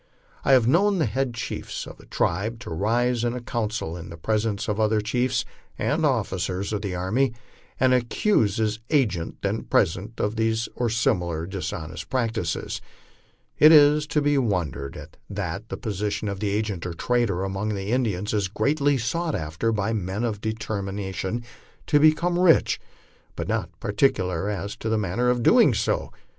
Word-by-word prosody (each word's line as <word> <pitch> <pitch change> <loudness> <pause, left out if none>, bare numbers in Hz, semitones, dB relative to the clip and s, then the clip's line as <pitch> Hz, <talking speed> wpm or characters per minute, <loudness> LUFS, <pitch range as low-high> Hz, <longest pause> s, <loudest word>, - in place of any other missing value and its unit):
I 135 - +4
havo 125 -3 +6
known 190 - +3
the 160 - +2
head 130 -3 -1
chiefs 115 - -5
of - - -11
a - - -16
tribe 105 +7 -1
to 125 - -7
rise 115 +7 +1
in 120 0 0
a - - -3
council 110 -7 -3
in 85 -1 -8
the 85 - -9
presence 105 +3 -1
of 105 0 -1
other 110 0 +3
chiefs 120 +3 0 0.3
and - - 0
of - - +5
officers 95 +3 -2
of 105 - -1
the 100 -4 -3
army, 115 +8 0 0.4
and 130 -1 +4
accuse 120 - +2
his 110 -1 0
agent, 105 - +1
then 100 +3 0
present, 100 +5 0
of 105 +2 -1
these 110 0 +1
or 120 -1 -1
similar 90 -9 0
dishonest 85 -3 -5
practices. 115 -9 -2 0.8
Is 150 -1 +7
it - - -22
to 150 - +1
be 145 -1 +3
wondered 85 - -2
at - - -11
that - - -4
the - - -4
position 105 0 -2
of 100 +1 -5
agent 105 -3 -1
or 85 - -5
trader 115 -4 0
among 95 +2 -2
the 100 +2 -3
Indians 105 -6 0
is 100 -3 +1
greatly 140 +8 +1
sought 165 +7 -1
after 80 +9 -1
by 110 0 0
men 100 +1 -2 0.2
deter 110 -2 -3
mined 95 +3 -3 0.4
to 145 - +4
become 170 +3 +3
rich, 180 -3 +4 0.5
but - - -4
not - - -1
particular 100 -4 +1
as 100 0 -3
to 110 - -3
the 110 - +2
manner 105 +5 0
of 120 -1 +1
doing - - +6
so? - - -1
110 Hz, 170 wpm, -25 LUFS, 95-125 Hz, 0.8 s, Is